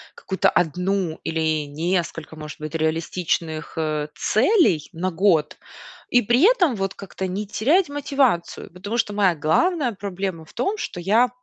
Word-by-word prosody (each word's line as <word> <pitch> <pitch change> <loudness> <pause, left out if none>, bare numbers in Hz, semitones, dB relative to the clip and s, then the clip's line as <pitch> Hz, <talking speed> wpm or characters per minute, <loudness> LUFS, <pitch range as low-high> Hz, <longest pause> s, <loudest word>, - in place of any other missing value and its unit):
какую-то 190 - +1
1 180 +1 0
или 160 -2 0
несколько, 165 +1 -2
может 150 -1 -9
быть, 155 +1 -6
реалистичных, 160 0 -2
э, 155 -2 -1
целей 220 - +3
на 175 +3 -1
год, 165 -4 +2 0.5
и 245 - +4
при 240 +6 +2
этом 380 - +4
вот 195 -1 -2
как-то 195 -1 -6
не 200 +3 -4
терять 300 - +2
мотивацию. 275 -11 0
Потому 200 +6 -5
что 210 -3 0
моя 195 -4 +3
главная 245 - +1
проблема 190 -4 -4
в - - -19
том, 390 - -1
что 305 - -5
я, 220 +8 +3
185 Hz, 145 wpm, -23 LUFS, 160-235 Hz, 0.5 s, и